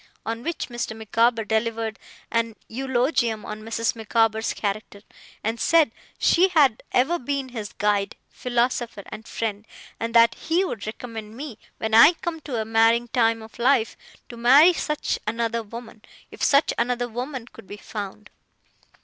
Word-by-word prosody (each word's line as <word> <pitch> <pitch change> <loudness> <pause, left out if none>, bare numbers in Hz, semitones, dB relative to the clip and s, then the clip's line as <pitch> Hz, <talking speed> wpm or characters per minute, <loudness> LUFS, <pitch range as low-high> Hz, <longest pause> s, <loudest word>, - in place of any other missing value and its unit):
On 230 +1 -3
which 335 +2 -4
Mr. 240 -2 -4
Micawber 225 +1 +1
delivered 220 0 -1 0.3
an 230 -1 0
eulogium 240 -2 0
on 215 0 -6
Mrs. 225 +1 -1
Micawber's 225 0 +1
character, 205 0 -4 0.4
and 225 +2 -2
said 325 -7 +4 0.3
she 360 +3 +4
had 290 - +3
ever 315 +8 +2
been 275 +1 -3
his 220 -4 -6
guide, 205 -1 0 0.2
philosopher, 240 -3 -1
and 215 +1 -9
friend, 210 -2 -3 0.4
and 230 0 -3
that 230 0 +7
he 345 +4 0
would 220 - -5
recommend 220 -1 -7
me, 270 -6 -7 0.2
when 220 0 -3
I 230 +10 +9
came 335 -1 -5
to 270 -6 -4
a 220 - -2
marrying 225 +2 +3
time 225 -1 +2
of 220 +2 -14
life, 240 -2 +2 0.3
to 235 - -9
marry 275 +9 +7
such 300 -2 -2
another 230 +1 -1
woman, 225 0 -10 0.3
if - - -12
such 280 +2 +4
another 245 0 0
woman 250 +2 -5
could 215 - -15
be 205 - -8
found. 210 0 -7
230 Hz, 155 wpm, -24 LUFS, 220-250 Hz, 0.4 s, I